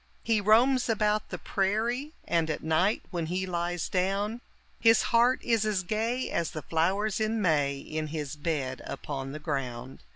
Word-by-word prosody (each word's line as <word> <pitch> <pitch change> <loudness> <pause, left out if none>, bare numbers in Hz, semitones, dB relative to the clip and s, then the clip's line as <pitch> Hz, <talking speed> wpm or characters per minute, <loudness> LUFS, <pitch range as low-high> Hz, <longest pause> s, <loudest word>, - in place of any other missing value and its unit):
He 225 -2 +2
roams 240 +5 +4
about 215 -1 +1
the - - -4
prairie, 230 +9 -1
and, 165 -2 +1
at 155 - -3
night 160 +7 +2
when 170 -3 -2
he 185 +3 -1
lies 175 -1 -2
down, 200 +5 -1 0.4
His 225 -1 +5
heart 240 +2 +5
is 230 -3 +2
as 210 -3 0
gay 225 +6 -1
as 170 -1 0
the 155 - -6
flowers 190 +6 0
in 220 +1 0
May 145 -7 +2
in 155 +2 -4
his 150 -2 -4
bed 145 -4 -2
upon 135 -2 -5
the 150 - -5
ground. 135 -5 -4
185 Hz, 165 wpm, -28 LUFS, 155-220 Hz, 0.4 s, His